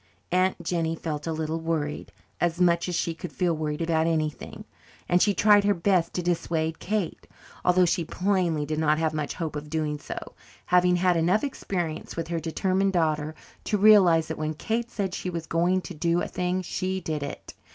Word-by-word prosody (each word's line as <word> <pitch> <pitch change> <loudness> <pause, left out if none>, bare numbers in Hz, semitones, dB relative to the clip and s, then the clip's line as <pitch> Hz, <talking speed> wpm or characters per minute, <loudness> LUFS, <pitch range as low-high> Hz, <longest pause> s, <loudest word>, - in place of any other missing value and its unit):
Aunt 185 0 +1
Jennie 165 -1 -1
felt 155 -2 -4
a - - 0
little 160 0 -2
worried 160 -2 -3 0.3
as 175 0 0
much 170 0 +3
as 175 - -2
she 170 - 0
could 165 +2 -8
feel 175 -3 0
worried 155 +1 -2
over 165 0 -1
anything 160 -1 -1 0.4
and 175 0 +3
she 205 -2 +3
tried 205 +2 +5
her 205 0 +3
best 175 -1 +2
to 180 - -1
dissuade 165 -2 -1
Kate, 205 -3 -3 0.4
although 180 0 +4
she 175 0 +1
plainly 180 -4 0
did 155 +1 -2
not 155 -1 +3
have 160 -1 0
much 150 -2 -3
hope 160 -3 -4
of 150 0 -6
doing 150 -1 -2
so, - - -7 0.5
having 180 0 +4
had 180 -1 +2
enough 175 +6 +2
experience 175 - -3
with 165 0 -4
her 170 -1 -1
determined 190 +4 0
daughter 155 -2 0 0.3
to 210 - +1
realize 190 -6 +6
that 160 - -5
when 155 0 -2
Kate 230 +8 -2
said 195 -5 -3
she 185 - -3
was 170 -2 -4
going 175 +3 +1
to - - -8
do 170 +2 +1
a - - -2
thing 180 +1 -2
she 185 +2 -2
did 155 -4 -3
it. 140 - -7
170 Hz, 195 wpm, -26 LUFS, 160-185 Hz, 0.5 s, realize